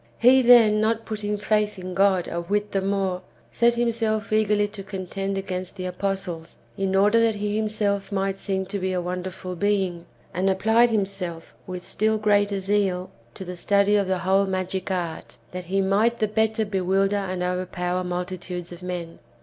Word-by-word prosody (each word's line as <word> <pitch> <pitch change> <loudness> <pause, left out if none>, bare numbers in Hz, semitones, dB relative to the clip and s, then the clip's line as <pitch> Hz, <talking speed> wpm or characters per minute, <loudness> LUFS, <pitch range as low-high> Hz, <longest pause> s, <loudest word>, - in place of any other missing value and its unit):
"^ - - -34
He, 255 +3 +6
then, 230 -4 +6
not 225 +1 0
putting 210 -1 -3
faith 210 0 0
in 185 0 -6
God 190 -1 +3
a 170 - -3
whit 205 +4 -1
the 195 - 0
more, 195 -2 -1 0.3
set 235 0 +3
himself 225 -2 0
eagerly 210 -1 +3
to 205 -1 -8
contend 195 0 -4
against 185 -1 -4
the 185 -2 -5
apostles, 180 -3 -4 0.2
in 195 0 -1
order 205 +4 +4
that 225 -1 +2
he 205 0 -2
himself 210 -2 -1
might 195 -1 -1
seem 190 -1 -2
to 200 +2 -4
be 185 0 -1
a 180 - 0
wonderful 180 +1 -5
being, 190 -3 0 0.3
and 185 +3 +1
applied 220 +5 +4
himself 195 -6 -3
with 180 -1 -6
still 220 +1 +1
greater 205 -1 +2
zeal 190 -2 0 0.2
to 190 - -7
the 180 0 -6
study 200 +3 +3
of 200 -2 +2
the 190 0 +1
whole 190 +2 +2
magic 185 0 -2
art, 175 -3 -4
that 180 0 -6
he 195 +3 0
might 210 +5 +2
the 215 - +1
better 220 +1 +1
bewilder 195 0 +1
and 185 -2 -2
overpower 180 0 -2
multitudes 180 0 -4
of 175 +1 -10
men. 175 -2 -5
195 Hz, 180 wpm, -24 LUFS, 185-210 Hz, 0.3 s, He